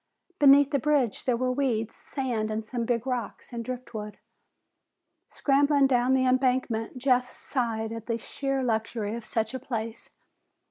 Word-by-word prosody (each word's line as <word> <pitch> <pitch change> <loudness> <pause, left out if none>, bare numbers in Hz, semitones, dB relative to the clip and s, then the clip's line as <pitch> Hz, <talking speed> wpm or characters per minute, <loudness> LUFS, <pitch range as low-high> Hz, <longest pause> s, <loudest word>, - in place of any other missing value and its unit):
Beneath 285 0 +7
the 280 - +2
bridge 280 -3 +1
there 250 -3 +2
were 255 +1 0
weeds, 240 -5 -1
sand, 220 -5 -3
some 235 +1 -3
big 235 0 0
rocks, 250 -1 -4
and 235 -1 -3
driftwood. 230 -4 -6 1.1
Scrambling 280 0 +3
down 255 0 +3
the 260 0 +2
embankment, 255 -3 +1
Jeff 250 -1 +2
sighed 225 -4 -2
at 225 -1 -7
the 230 -1 0
sheer 275 +3 -2
luxury 220 -2 -1
of 235 0 -5
such 220 +1 -2
a 260 - -3
place. 230 -3 -5
250 Hz, 145 wpm, -27 LUFS, 225-265 Hz, 1.1 s, Beneath